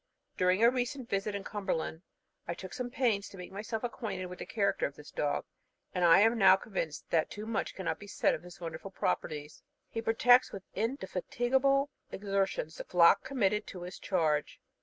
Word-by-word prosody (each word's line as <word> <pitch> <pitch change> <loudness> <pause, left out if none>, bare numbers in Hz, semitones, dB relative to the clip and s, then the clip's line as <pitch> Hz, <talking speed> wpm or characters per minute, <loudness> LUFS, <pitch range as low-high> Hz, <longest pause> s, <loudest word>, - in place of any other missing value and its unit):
During 185 +4 +3
a 235 - +7
recent 255 0 -2
visit 200 +1 -1
in 200 - -4
Cumberland, 175 -6 -3 0.5
I 170 - -2
took 185 +1 -9
some 250 -1 -3
pains 230 -6 0
to 195 - -12
make 180 - -8
myself 215 +3 -4
acquainted 220 -6 -3
with 180 0 -8
the - - -6
character 200 -5 +1
of 140 - -12
this 150 - -12
dog, 145 - -1 0.5
and 180 - 0
I 170 +2 +7
am 225 +2 +4
now 190 -2 +8
convinced 180 -6 -4
that 160 -2 +2
too 210 +1 -7
much 225 -1 -2
cannot 190 -3 -2
be 205 - -10
said - - +2
of - - -4
his 180 +1 -12
wonderful 165 +2 -6
properties. 155 -5 -3 0.3
He 225 - -3
protects 245 +3 +5
with 195 - -7
indefatigable 260 +5 +1 0.2
exertions 195 -5 -1
the - - -5
flock 170 -2 +5
committed 210 -5 0
to 180 -2 -7
his 180 +1 -8
charge. 160 -6 0
195 Hz, 185 wpm, -31 LUFS, 180-230 Hz, 0.5 s, now